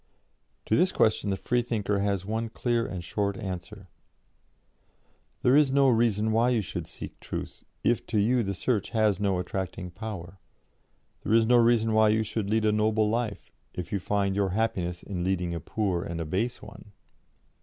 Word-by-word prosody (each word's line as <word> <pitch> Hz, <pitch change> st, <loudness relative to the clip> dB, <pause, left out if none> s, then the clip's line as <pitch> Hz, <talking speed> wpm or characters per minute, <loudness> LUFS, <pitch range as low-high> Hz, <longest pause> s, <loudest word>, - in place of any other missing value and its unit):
To 110 Hz, -, +2 dB
this 185 Hz, +6 st, +3 dB
question 110 Hz, -2 st, +2 dB
the 95 Hz, -, 0 dB
Freethinker 115 Hz, -4 st, 0 dB
has 100 Hz, -2 st, -1 dB
one 110 Hz, +2 st, -2 dB
clear 120 Hz, 0 st, 0 dB
and 90 Hz, -2 st, -5 dB
short 100 Hz, +3 st, -2 dB
answer: 95 Hz, +1 st, -7 dB, 1.6 s
'There 125 Hz, +1 st, +5 dB
is 145 Hz, -2 st, +5 dB
no 135 Hz, 0 st, +4 dB
reason 110 Hz, -2 st, +2 dB
why 115 Hz, +3 st, +3 dB
you 120 Hz, -3 st, +2 dB
should 85 Hz, -, -5 dB
seek -, -, -9 dB
Truth, -, -, -6 dB, 0.2 s
if 120 Hz, -, +2 dB
to 110 Hz, -, -1 dB
you 120 Hz, +4 st, +3 dB
the 100 Hz, -3 st, -2 dB
search 105 Hz, 0 st, -1 dB
has 105 Hz, -3 st, +3 dB
no 100 Hz, -2 st, +1 dB
attracting 90 Hz, 0 st, -4 dB
power. 95 Hz, -2 st, -7 dB, 0.8 s
There 110 Hz, -, +1 dB
is 115 Hz, -1 st, +5 dB
no 120 Hz, +2 st, +5 dB
reason 115 Hz, -2 st, +3 dB
why 110 Hz, 0 st, +5 dB
you 110 Hz, +1 st, +2 dB
should 105 Hz, -1 st, -3 dB
lead 110 Hz, 0 st, +2 dB
a 105 Hz, -, +4 dB
noble 105 Hz, 0 st, +2 dB
life, 115 Hz, -3 st, -3 dB, 0.2 s
if 90 Hz, -, -5 dB
you 100 Hz, -, 0 dB
find 100 Hz, 0 st, 0 dB
your 100 Hz, -1 st, +1 dB
happiness 90 Hz, -4 st, -1 dB
in 90 Hz, -3 st, -4 dB
leading 90 Hz, -2 st, -1 dB
a 85 Hz, -, -3 dB
poor 95 Hz, +1 st, -1 dB
and 85 Hz, -3 st, -5 dB
a 80 Hz, -, -2 dB
base 110 Hz, +10 st, -2 dB
one.' 105 Hz, -, -13 dB
105 Hz, 180 wpm, -27 LUFS, 95-115 Hz, 1.6 s, There